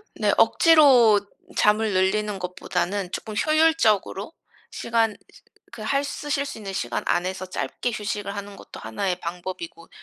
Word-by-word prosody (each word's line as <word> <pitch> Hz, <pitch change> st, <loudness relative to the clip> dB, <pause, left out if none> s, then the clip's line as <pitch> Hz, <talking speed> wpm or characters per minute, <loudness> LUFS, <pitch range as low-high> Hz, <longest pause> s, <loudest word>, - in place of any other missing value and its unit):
네 -, -, +1 dB
억지로 260 Hz, -, +6 dB, 0.3 s
잠을 210 Hz, 0 st, +2 dB
늘리는 195 Hz, +2 st, +1 dB
것보다는 180 Hz, +1 st, -3 dB
쪼끔 215 Hz, -, -5 dB
효율적으로 310 Hz, -, +2 dB, 0.4 s
시간 230 Hz, -1 st, 0 dB
으 -, -, -13 dB, 0.6 s
그 235 Hz, -, -10 dB
할 275 Hz, +6 st, 0 dB
쓰실 285 Hz, 0 st, -2 dB
수 275 Hz, -, -7 dB
있는 195 Hz, -2 st, -6 dB
시간 120 Hz, -9 st, -2 dB
안에서 185 Hz, +1 st, -1 dB
짧게 245 Hz, +6 st, -3 dB
휴식을 205 Hz, -1 st, -4 dB
하는 200 Hz, 0 st, -7 dB
것도 -, -, -12 dB
하나의 195 Hz, -3 st, -2 dB
방법이고 185 Hz, -, -7 dB
210 Hz, 305 characters per minute, -24 LUFS, 190-260 Hz, 0.6 s, 억지로